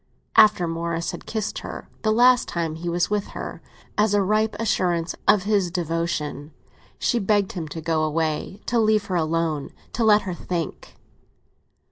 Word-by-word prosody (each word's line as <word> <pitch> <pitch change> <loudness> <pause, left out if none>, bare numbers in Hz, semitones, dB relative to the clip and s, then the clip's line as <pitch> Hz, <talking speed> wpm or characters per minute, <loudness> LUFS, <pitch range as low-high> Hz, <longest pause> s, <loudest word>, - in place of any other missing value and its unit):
After 210 -5 +6
Morris 165 0 -2
had - - -9
kissed 220 -1 -3
her, - - -8
the 215 - +2
last 245 +2 +5
time 165 -2 -2
he 170 +2 -4
was 175 +3 0
with 210 -1 0
her, - - -6 0.4
as 210 -1 +3
a 205 - +3
ripe 215 +2 +1
assurance 175 -6 0
of 200 -3 +5
his 200 -3 +1
devotion, 165 -3 -3 0.4
she 240 - +1
begged 205 -1 +1
him 170 -4 -5
to 160 +2 -6
go 160 0 0
away, 155 +5 -2
to 240 - +1
leave 215 -1 +3
her 185 - -3
alone, 160 -3 0 0.2
to 235 - 0
let 215 -1 +5
her 185 - -3
think. 170 -2 -5
180 Hz, 165 wpm, -24 LUFS, 165-210 Hz, 0.4 s, After